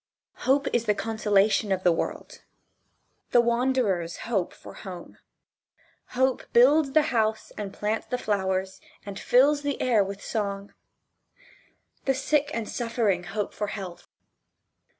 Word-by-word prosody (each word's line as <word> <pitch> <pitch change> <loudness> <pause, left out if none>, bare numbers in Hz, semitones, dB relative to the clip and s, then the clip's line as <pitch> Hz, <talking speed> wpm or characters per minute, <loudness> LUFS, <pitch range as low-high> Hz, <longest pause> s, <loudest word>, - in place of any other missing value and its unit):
Hope 275 +1 +4
is 240 -1 +1
the 210 -2 +2
consolation 210 -1 +1
of 190 -1 0
the 180 - +5
world. 165 - -4 0.9
The 245 - +5
wanderers 235 -8 +1
hope 200 -7 -1
for - - -13
home. 180 -4 -10 1.0
Hope 260 0 +2
builds 275 +3 +5
the 310 0 +5
house 220 -1 0
and 205 -2 -5
plants 215 +2 -2
the 250 - -1
flowers 190 -4 -1 0.2
and 200 -1 -6
fills 285 +4 +4
the 285 -1 -2
air 230 -5 +3
with 195 +1 -7
song. 200 -2 -3 1.3
The 270 - +2
sick 285 +2 +1
and 230 -6 -3
suffering 225 -7 -1
hope 205 +2 -3
for 210 - -3
health. 190 -4 -7
215 Hz, 130 wpm, -26 LUFS, 195-250 Hz, 1.3 s, the